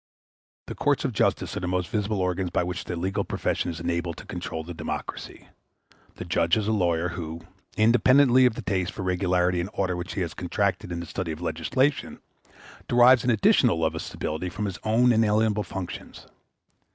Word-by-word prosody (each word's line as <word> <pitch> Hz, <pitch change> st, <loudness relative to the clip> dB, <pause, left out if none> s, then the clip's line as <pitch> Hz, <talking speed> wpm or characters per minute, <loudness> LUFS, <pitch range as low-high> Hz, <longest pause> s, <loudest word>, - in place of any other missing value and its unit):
The -, -, -6 dB
courts -, -, 0 dB
of -, -, -1 dB
justice -, -, 0 dB
are -, -, -2 dB
the 90 Hz, -, -3 dB
most 90 Hz, -1 st, -1 dB
visible 105 Hz, -2 st, -1 dB
organs 90 Hz, 0 st, -1 dB
by 85 Hz, -, 0 dB
which 90 Hz, 0 st, -4 dB
the 90 Hz, -, -4 dB
legal 95 Hz, +4 st, -1 dB
profession -, -, -2 dB
is 85 Hz, -1 st, -5 dB
enabled 85 Hz, 0 st, -2 dB
to -, -, -10 dB
control 80 Hz, -, -5 dB
the 85 Hz, +2 st, -7 dB
democracy. -, -, -6 dB, 0.7 s
The -, -, -7 dB
judge 85 Hz, +3 st, +2 dB
is 105 Hz, -1 st, -1 dB
a -, -, +2 dB
lawyer, 90 Hz, -4 st, +1 dB
who, 85 Hz, -1 st, -6 dB, 0.4 s
independently 125 Hz, +3 st, +5 dB
of 115 Hz, -, -2 dB
the 120 Hz, -, -6 dB
taste 95 Hz, -1 st, -1 dB
for 95 Hz, -, -5 dB
regularity 90 Hz, -1 st, +1 dB
and 90 Hz, -, -4 dB
order 95 Hz, -2 st, -1 dB
which 90 Hz, +1 st, -5 dB
he 95 Hz, -, -1 dB
has 85 Hz, -3 st, -3 dB
contracted 95 Hz, +1 st, -1 dB
in 85 Hz, 0 st, -3 dB
the -, -, -6 dB
study 85 Hz, 0 st, -4 dB
of 80 Hz, -, -6 dB
legislation, 90 Hz, -, -1 dB, 0.7 s
derives 125 Hz, +1 st, +6 dB
an 125 Hz, -, 0 dB
additional 105 Hz, -6 st, +4 dB
love 80 Hz, -1 st, +1 dB
of 80 Hz, -, -4 dB
stability 80 Hz, +4 st, -4 dB
from 105 Hz, +4 st, -4 dB
his 95 Hz, -3 st, -4 dB
own 120 Hz, +3 st, +4 dB
inalienable 110 Hz, -1 st, +2 dB
functions. 95 Hz, -3 st, -7 dB
90 Hz, 190 wpm, -26 LUFS, 85-110 Hz, 0.7 s, derives